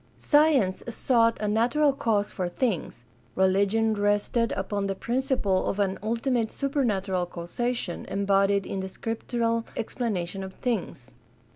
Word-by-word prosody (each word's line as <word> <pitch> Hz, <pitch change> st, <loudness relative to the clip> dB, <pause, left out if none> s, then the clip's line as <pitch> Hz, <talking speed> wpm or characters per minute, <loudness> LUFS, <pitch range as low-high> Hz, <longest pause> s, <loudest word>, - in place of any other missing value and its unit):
Science 290 Hz, -11 st, +3 dB
sought 230 Hz, -1 st, +2 dB
a 210 Hz, -, -1 dB
natural 245 Hz, +7 st, +3 dB
cause 210 Hz, -6 st, 0 dB
for 180 Hz, -2 st, -2 dB
things; 175 Hz, -, -2 dB, 0.3 s
religion 200 Hz, +4 st, +2 dB
rested 205 Hz, +3 st, +1 dB
upon 200 Hz, +1 st, -2 dB
the 195 Hz, -, -2 dB
principle 240 Hz, -5 st, 0 dB
of -, -, -2 dB
an 195 Hz, -2 st, 0 dB
ultimate 230 Hz, +1 st, 0 dB
supernatural 205 Hz, -10 st, -1 dB
causation 180 Hz, +4 st, -3 dB
embodied 195 Hz, 0 st, +2 dB
in 195 Hz, -, -4 dB
the 190 Hz, 0 st, -4 dB
scriptural 230 Hz, +2 st, -2 dB
explanation 195 Hz, -6 st, -3 dB
of 190 Hz, 0 st, -8 dB
things. 185 Hz, -, -3 dB
210 Hz, 125 wpm, -26 LUFS, 190-235 Hz, 0.3 s, Science